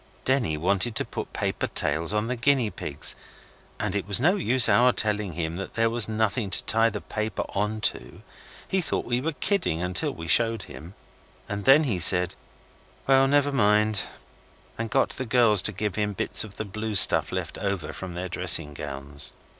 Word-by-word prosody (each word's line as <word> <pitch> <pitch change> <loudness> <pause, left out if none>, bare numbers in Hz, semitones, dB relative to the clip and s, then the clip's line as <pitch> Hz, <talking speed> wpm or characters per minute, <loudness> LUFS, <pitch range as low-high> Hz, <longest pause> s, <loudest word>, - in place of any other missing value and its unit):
Denny 125 - 0
wanted 100 +7 0
to - - 0
put - - -7
paper - - -3
tails 80 +4 0
on 105 +1 -1
the 125 +2 -3
guinea 125 -2 +1
pigs, 70 - 0 0.6
and - - -3
it 100 -1 -3
was 100 +1 +2
no 175 +9 +2
use 130 - +4
our 120 +4 +4
telling 105 -5 -1
him 80 +1 -4 0.2
there 115 0 +1
was 115 -2 +2
nothing 110 0 -1
to - - +1
tie 115 +1 +2
the 105 -2 -7
paper 110 0 -4
on 105 +2 -3
to. - - -3 0.4
He 190 - 0
thought - - -3
we 120 +1 -1
were 160 +3 -3
kidding 180 - -1
until 90 0 -1
we 85 0 -9
showed 115 +5 +3
him, 85 +6 -12 0.5
and 100 0 -6
then 135 +4 +6
he 110 -11 -2
said, 90 0 +6 0.7
'Well, 135 0 +4
never 145 +1 +2
mind', 105 -4 +2 0.7
and 115 0 -5
got - - 0
the 130 - -5
girls 110 -4 +5
to 105 - +1
give 105 0 -4
him 105 +1 -2
bits - - 0
of 105 -2 -12
the 110 - -4
blue 110 +2 -5
stuff 95 - +6
left - - -5
over 90 -6 -4
from 90 -2 -8
their 90 +1 -5
dressing 85 -4 +1
gowns. 70 0 -6
105 Hz, 185 wpm, -25 LUFS, 90-120 Hz, 0.7 s, then